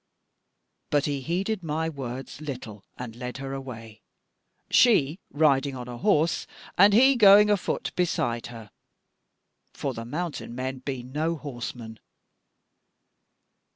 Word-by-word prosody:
But 145 -1 +2
he 145 -2 -2
heeded 190 - -2
my 160 0 -2
words 135 -2 -6
little, 120 -9 -7
and 120 -2 -7
led 125 +1 -6
her 135 0 -5
away, 115 -5 -8 0.7
she 180 - +4
riding 140 -2 +2
on 125 -1 -7
a 120 -1 -7
horse 170 -5 +2 0.3
and 200 +3 +7
he 265 +6 +6
going 210 -2 +7
afoot 200 -3 -1
beside 120 -9 -1
her; 115 -3 -11 1.0
for - - -3
the 115 - -6
mountain 150 -2 -5
men 130 +1 -4
be 130 -1 -5
no 155 +6 -2
horsemen." 120 -6 -7
135 Hz, 120 wpm, -26 LUFS, 125-170 Hz, 1.0 s, and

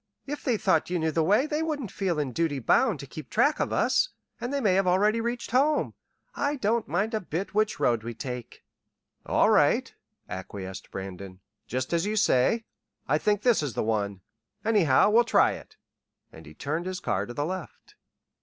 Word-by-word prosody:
If 290 +1 -5
they 245 -4 +1
thought 185 -7 +1
you 180 - 0
knew 160 -1 0
the 165 - +1
way 205 - +3
they 305 0 -2
wouldn't 295 - -3
feel 185 -5 -1
in 145 -4 -1
duty 155 +2 0
bound 175 - +2
to - - -7
keep 140 +2 -10
track 285 +7 +2
of - - -1
us, - - +2 0.3
and 240 +2 -4
they 280 - 0
may 210 -8 +2
have 195 0 +2
already 210 +5 +3
reached 235 0 -3
home. 285 +5 +2 0.4
I 285 +1 -1
don't 230 -3 0
mind 195 - -1
a 220 - +1
bit 185 +1 -4
which 215 +1 +1
road 120 -2 +2
we 115 +1 -6
take." 125 -1 -7 0.6
"All - - +3
right," - - +3 0.3
acquiesced 95 0 -7
Brandon. 95 0 -8 0.3
"Just 130 +5 -3
as 170 +3 +1
you 215 - -1
say. 215 - +2 0.4
I 150 +3 +2
think 205 +2 +1
this 240 -7 +4
is 145 -5 -4
the - - 0
one. 100 -3 -1 0.4
Anyhow, 200 -6 +4
we'll 235 +3 +6
try - - +4
it." - - -10 0.5
And 80 -1 -13
he 75 - -13
turned 160 - -3
his 185 -1 -3
car 100 +1 -1
to 120 - -7
the 145 - -1
left. 185 0 -7
180 Hz, 195 wpm, -27 LUFS, -, 0.6 s, we'll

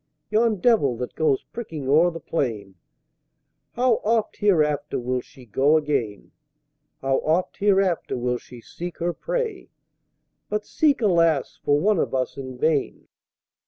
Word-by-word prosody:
Yon 220 +1 +3
"Devil" 175 - +3
that 125 - -5
goes 150 -4 +1
pricking 160 - -6
o'er 160 +6 +5
the 165 -1 -7
Plain, 110 -12 -3 1.0
How 245 -1 +2
oft 225 0 0
hereafter 150 -7 +1
will 125 +1 -2
she 130 0 -17
go 135 +8 +3
again! 140 -9 -2 0.7
How 135 0 +1
oft 165 +4 0
hereafter 195 -7 +1
will 125 0 -1
she 120 -2 -13
seek 175 +8 -8
her 175 +1 -1
prey? - - -3 0.8
But 210 0 -2
seek, 285 -6 +1
alas, 165 -7 +2
for 145 0 +3
one 200 +2 +2
of - - -1
us 130 -1 -1
in 130 -2 -7
vain! 150 +1 -1
155 Hz, 140 wpm, -24 LUFS, 130-205 Hz, 1.0 s, o'er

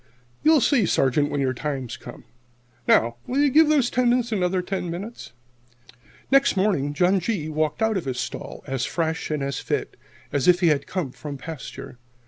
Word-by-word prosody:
You'll 310 -2 +5
see, 235 - +3
Sergeant, 145 +1 +2
when 145 - -1
your 130 -1 +1
time 135 -1 -3
comes. - - -9 0.6
Will 120 - +2
you 290 -1 +4
give 310 +2 +6
those 280 -6 +3
tendons 245 -1 +2
another 185 -3 0
ten 185 -1 -3
minutes?" 195 - -7 1.0
Next 275 -5 +4
morning 175 -8 +1
John 180 +5 +3
G. 180 -5 -2
walked 155 +4 -1
out 220 -2 +2
of 180 - -4
his 130 -2 -3
stall - - -6
as 135 -3 -2
fresh 160 +3 -2
and 150 -2 -1
as 140 -1 -2
fit - - -3 0.4
as 145 +1 +1
if 180 -1 +6
he 170 - +5
had 145 -2 0
come 175 -9 -3
from 145 +1 -7
pasture. 140 -4 -8
170 Hz, 175 wpm, -24 LUFS, 140-220 Hz, 1.0 s, give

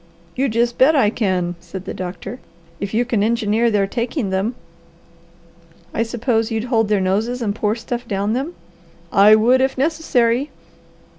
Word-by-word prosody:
"You 270 +1 +1
just 235 +1 0
bet 295 +5 +6
I 215 -7 +3
can," 185 -6 -1
said 180 +2 -9
the - - -5
doctor, 190 +6 -6 0.4
"if 200 -1 -4
you 235 +3 +1
can 235 -4 0
engineer 225 +1 +2
their 205 -3 +2
taking 235 - -2
them." 195 +6 -1 1.4
"I - - -1
suppose 230 0 0
you'd 225 -1 -2
hold 225 -1 +3
their 210 -1 +2
noses 210 +7 0
and 215 -4 -1
pour 210 0 0
stuff 240 +1 -5
down 200 0 -1
them." 275 +8 -3 0.6
"I 210 +1 +7
would 245 +4 +4
if 265 0 0
necessary." 275 -3 +1
225 Hz, 160 wpm, -20 LUFS, 205-245 Hz, 1.4 s, I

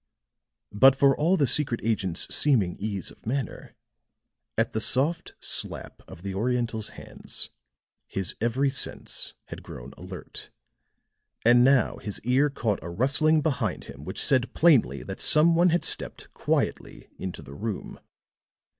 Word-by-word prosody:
But 130 +6 +6
for 135 0 +4
all 170 +6 +2
the 145 - +3
secret 130 -2 +1
agent's 95 -6 0
seeming 110 -12 +2
ease 100 -2 -3
of - - -17
manner, 135 +2 -4 0.8
at 115 0 0
the 110 - 0
soft 145 +9 +1
slap - - -3
of 85 - -12
the 100 -1 -4
Oriental's 115 +1 -1
hands, - - -6 0.6
his 95 -2 -2
every 130 +4 +1
sense - - -3
had - - -8
grown - - -10
alert; - - -9 1.0
and 120 +1 +6
now 130 -2 +3
his 105 - -4
ear 130 +5 +2
caught 115 -7 -2
a 85 - -6
rustling 140 - +2
behind 135 - -1
him 70 +1 -11
which 95 - -2
said 130 -3 +1
plainly 160 -7 +4
that - - -7
some 160 +2 +4
one 175 +2 +4
had 175 +1 +1
stepped - - -2
quietly - - -2
into 95 -2 -6
the 70 - -11
room. 105 +6 -5
120 Hz, 145 wpm, -26 LUFS, 105-140 Hz, 1.0 s, But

